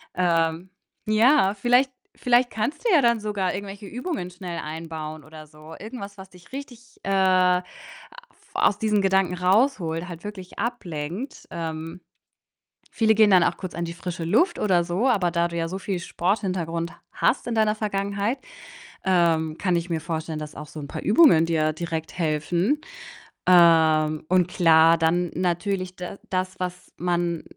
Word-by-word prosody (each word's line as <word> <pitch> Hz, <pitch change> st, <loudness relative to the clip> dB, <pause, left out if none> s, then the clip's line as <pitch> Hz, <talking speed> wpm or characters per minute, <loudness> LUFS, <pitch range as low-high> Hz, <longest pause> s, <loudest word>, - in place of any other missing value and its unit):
Ähm, 170 Hz, 0 st, +1 dB, 0.4 s
ja, 215 Hz, -1 st, +4 dB
vielleicht 245 Hz, +5 st, +3 dB, 0.3 s
vielleicht 245 Hz, 0 st, +3 dB
kannst 225 Hz, -, -3 dB
du 465 Hz, -, +3 dB
ja 305 Hz, -, +6 dB
dann 235 Hz, -2 st, +3 dB
sogar 205 Hz, -3 st, -2 dB
irgendwelche 200 Hz, +1 st, -7 dB
Übungen 250 Hz, -, -4 dB
schnell 175 Hz, -2 st, -6 dB
einbauen 155 Hz, -1 st, -6 dB
oder 155 Hz, 0 st, -12 dB
so. 155 Hz, +1 st, -13 dB
Irgendwas, 205 Hz, -3 st, -8 dB
was 190 Hz, 0 st, -11 dB
dich 180 Hz, +7 st, -19 dB
richtig, 250 Hz, -3 st, -10 dB
äh, 195 Hz, -, -4 dB
af 185 Hz, -1 st, +3 dB, 0.9 s
aus 205 Hz, -, +2 dB
diesen 210 Hz, -2 st, +2 dB
Gedanken 190 Hz, -2 st, +2 dB
raus 210 Hz, +9 st, +3 dB
holt, 165 Hz, 0 st, -4 dB
halt 170 Hz, 0 st, -9 dB
wirklich 195 Hz, -3 st, -9 dB
ablenkt. 190 Hz, -, -5 dB
Ähm, 165 Hz, +1 st, -5 dB, 0.9 s
viele 220 Hz, -1 st, +3 dB
gehen 215 Hz, 0 st, +5 dB
dann 185 Hz, -3 st, +6 dB
auch -, -, 0 dB
kurz 185 Hz, -3 st, -7 dB
an 170 Hz, -, -3 dB
die 170 Hz, -, -5 dB
frische 175 Hz, 0 st, -6 dB
Luft 315 Hz, -, +2 dB
oder 185 Hz, -4 st, +2 dB
so, 185 Hz, +9 st, -1 dB
aber 195 Hz, -8 st, +2 dB
da 170 Hz, 0 st, +1 dB
du 170 Hz, -, -7 dB
ja 165 Hz, 0 st, -1 dB
so 190 Hz, +3 st, -5 dB
viel 195 Hz, -1 st, -3 dB
Sporthintergrund 170 Hz, -3 st, -2 dB, 0.2 s
hast 255 Hz, -, +1 dB
in 235 Hz, -, -2 dB
deiner 215 Hz, -1 st, +2 dB
Vergangenheit, 200 Hz, +3 st, -2 dB, 0.7 s
ähm, 165 Hz, -4 st, +2 dB
kann 180 Hz, -3 st, +1 dB
ich 170 Hz, +1 st, -2 dB
mir 160 Hz, -2 st, -2 dB
vorstellen, 160 Hz, -1 st, -4 dB
dass 150 Hz, 0 st, -7 dB
auch -, -, -8 dB
so 160 Hz, -, -10 dB
'n 140 Hz, -, -6 dB
paar -, -, -5 dB
Übungen 205 Hz, -, +5 dB
dir 155 Hz, -2 st, +1 dB
direkt 160 Hz, +1 st, -5 dB
helfen. 170 Hz, -, 0 dB, 0.7 s
Ähm, 160 Hz, -3 st, +5 dB
und 180 Hz, -1 st, +3 dB
klar, 165 Hz, -2 st, +5 dB
dann 170 Hz, +2 st, +1 dB
natürlich 185 Hz, +1 st, -1 dB
d 180 Hz, +2 st, -7 dB
das, 185 Hz, 0 st, -2 dB
was 180 Hz, 0 st, -5 dB
man 175 Hz, -1 st, -1 dB
180 Hz, 165 wpm, -24 LUFS, 165-205 Hz, 0.9 s, ja